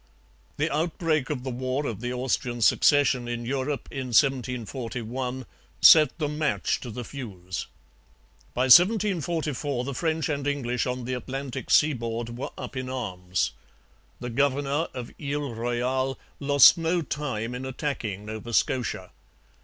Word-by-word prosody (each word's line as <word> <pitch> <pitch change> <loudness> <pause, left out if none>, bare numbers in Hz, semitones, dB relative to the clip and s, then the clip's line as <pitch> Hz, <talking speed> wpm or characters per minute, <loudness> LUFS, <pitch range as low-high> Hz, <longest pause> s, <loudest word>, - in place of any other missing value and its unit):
The - - 0
outbreak 160 -3 0
of 135 -5 -3
the 130 - -3
war 130 +3 -2
of 115 -5 -4
the 125 0 -3
Austrian 125 -1 -1
Succession 130 -1 +4
in 120 0 -4
Europe 135 +2 -2
in 135 -2 -4
1741 125 0 -1 0.3
set 155 -2 +7
the 155 -3 -1
match 150 -1 0
to 125 - -8
the 120 +2 -6
fuse. 95 - -6 0.9
By 125 - +2
1744 165 - +3
the 140 +2 -4
French 160 +1 -1
and 145 -2 -2
English 125 -3 -1
on 125 0 -3
the 130 - -3
Atlantic 130 +1 -5
seaboard 120 -5 +1
were 125 - -4
up - - -7
in 130 0 -4
arms. 90 -8 -2 0.7
The 120 0 -5
governor 140 +4 +1
of 125 -2 -6
Ile 145 -2 -3
Royale 125 +3 -1 0.2
lost 140 +2 +7
no 165 +1 0
time 125 -6 -3
in 125 +1 -5
attacking 125 -7 -4
Nova 110 +2 -6
Scotia. 115 -8 0
130 Hz, 140 wpm, -26 LUFS, 120-145 Hz, 0.9 s, set